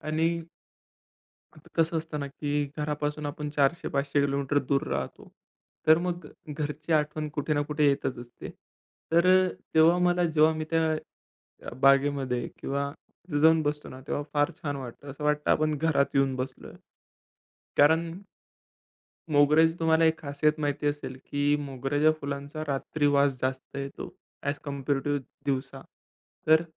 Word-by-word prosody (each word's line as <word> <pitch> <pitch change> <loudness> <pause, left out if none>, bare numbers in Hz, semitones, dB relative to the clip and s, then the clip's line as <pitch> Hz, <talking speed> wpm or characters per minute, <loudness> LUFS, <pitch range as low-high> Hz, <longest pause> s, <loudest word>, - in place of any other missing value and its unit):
आणि 160 +2 0 1.2
आता 155 - -17
कसं 165 0 +2
असतं 160 -1 -4
ना 140 - -3
की 145 +1 -5 0.3
घरापासून 150 0 -2
आपण 145 +1 -4
400-500 140 -1 +1
किलोमीटर 140 0 +1
दूर 140 0 +2
राहतो. 70 -1 -4 0.6
तर 155 +1 +7
मग 175 -2 -3 0.2
घरची 150 +1 -3
आठवण 150 0 0
कुठे 145 +1 -1
ना 145 - +2
कुठे 150 0 +2
येतच 135 -2 -1
असते. 120 0 -9 0.6
तर 170 +2 +5
अ, 185 0 +5 0.3
तेव्हा 165 +3 +6
मला 175 0 +3
जेव्हा 160 -1 +4
मी 155 0 -3
त्या 165 0 +2 0.8
अ, - - -6
बागेमध्ये 135 -2 +3
किंवा 140 +1 -2
तिथे 150 -2 -6
जाऊन 160 +1 +6
बसतो 150 0 -2
ना 130 - -10
तेव्हा 145 - -2
फार 145 +2 +3
छान 145 -3 -2
वाटत. 130 -1 -9
असं 145 +1 -7
वाटतं 150 0 +1
आपण 155 0 +2
घरात 155 -2 +1
येऊन 135 -1 +3
बसलोय. 130 0 -6 1.1
कारण 160 +3 +4 1.2
मोगऱ्याची 150 +3 +5
तुम्हाला 160 0 +4
एक 160 0 +3
खासियत 145 +1 +1
माहिती 145 0 -1
असेल 145 -3 -2
की 145 0 +2
मोगऱ्याच्या 140 +2 +1
फुलांचा 140 +2 -5
रात्री 145 +2 -1
वास 140 -1 +3
जास्त 130 +1 -3
येतो 140 0 -5 0.3
ॲज 140 +1 -2
कम्पॅरेटिव्ह 140 0 -1 0.3
दिवसा. 135 0 -2 0.7
तर 160 +1 +6
145 Hz, 140 wpm, -28 LUFS, 140-155 Hz, 1.2 s, तर